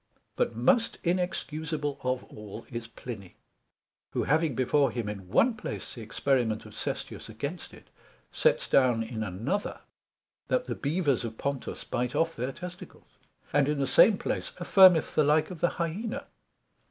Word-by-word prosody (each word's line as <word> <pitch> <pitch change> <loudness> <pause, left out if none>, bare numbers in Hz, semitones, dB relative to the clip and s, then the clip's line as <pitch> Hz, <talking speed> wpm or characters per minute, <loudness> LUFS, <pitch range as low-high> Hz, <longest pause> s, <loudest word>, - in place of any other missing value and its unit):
But 115 - 0
most 220 - +2
inexcusable 160 -4 -2
of 130 0 -1
all 105 +1 -10
is 115 -1 -5
Pliny; 110 -5 -9 0.8
who - - 0
having 160 -5 +2
before 135 +3 +3
him 120 -4 -3
in 100 -3 -6
one 235 - +4
place 220 - -6
the 120 - -8
experiment 115 0 0
of - - -12
Sestius - - -4
against 140 +11 -5
it, - - -15 0.4
sets - - +2
down 125 -4 +4
in 110 -1 -5
another, 110 - -2 0.7
that - - +1
the - - -3
Bevers 145 -4 0
of 110 -1 -5
Pontus 140 -2 -3
bite 125 0 -2
off 165 0 +1
their 125 +3 -2
testicles: 180 +4 -11 0.3
and 145 0 +3
in 150 - 0
the 140 - +1
same 205 - +6
place - - -3
affirmeth 180 -2 +6
the 155 - +4
like 150 +4 +3
of 175 - -7
the 175 - +4
Hyena. 220 - -3
140 Hz, 155 wpm, -29 LUFS, 120-175 Hz, 0.8 s, same